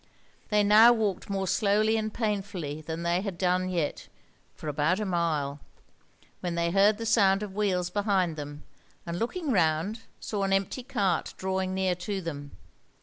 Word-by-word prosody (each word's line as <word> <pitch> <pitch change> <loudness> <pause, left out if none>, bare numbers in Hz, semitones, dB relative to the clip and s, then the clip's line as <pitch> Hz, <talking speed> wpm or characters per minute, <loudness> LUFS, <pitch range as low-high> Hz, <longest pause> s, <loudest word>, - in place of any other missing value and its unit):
They 210 -1 +3
now 215 +3 +8
walked 210 -6 -2
more 195 -1 -1
slowly 215 +3 +2
and 215 -1 -1
painfully 195 -9 -3
than 160 +2 -5
they 170 +1 +1
had 195 -3 -5
done 185 0 +1
yet 170 -5 -2 0.5
for - - -9
about 150 +6 +1
a 215 - -1
mile, 155 -6 -1 0.8
when 175 -1 -3
they 170 0 0
heard 200 +3 +4
the 230 - -5
sound 200 -3 +3
of 200 -2 -6
wheels 185 -4 0
behind 195 -4 +1
them, 145 0 -7 0.4
and 170 0 -4
looking 300 +6 -2
round 180 +3 +1 0.2
saw 205 -2 -3
an 195 0 +1
empty 195 +6 0
cart 205 -9 -1
drawing 190 0 -2
near 190 -1 +1
to 190 +3 -4
them. 145 -5 -6
190 Hz, 165 wpm, -28 LUFS, 170-210 Hz, 0.8 s, now